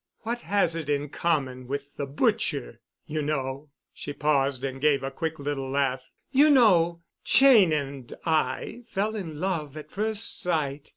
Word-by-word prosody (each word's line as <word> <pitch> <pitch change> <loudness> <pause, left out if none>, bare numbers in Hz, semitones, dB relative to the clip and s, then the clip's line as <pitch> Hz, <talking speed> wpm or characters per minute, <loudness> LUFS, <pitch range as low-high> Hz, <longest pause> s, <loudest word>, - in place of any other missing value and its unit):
What 235 +2 -3
has 195 -5 +1
it 160 -3 -5
in 145 0 -1
common 135 -5 -1
with 140 +1 -5
the 140 - -3
butcher? 135 - 0 0.3
You 155 0 -3
know"—she 145 0 -5
paused 140 -3 +1
and 135 -1 -4
gave 140 -2 +3
a 135 - -3
quick 160 +3 -3
little 140 -2 -3
laugh—"you 140 - +1
know, 175 - +4 0.2
Cheyne 240 -11 +6
and 140 -4 -3
I 160 +8 -1
fell 210 +2 -2
in 165 -8 -6
love 155 -5 -3
at 150 0 -10
first 220 +2 -1
sight. 150 -4 -2
150 Hz, 150 wpm, -26 LUFS, 140-180 Hz, 0.3 s, Cheyne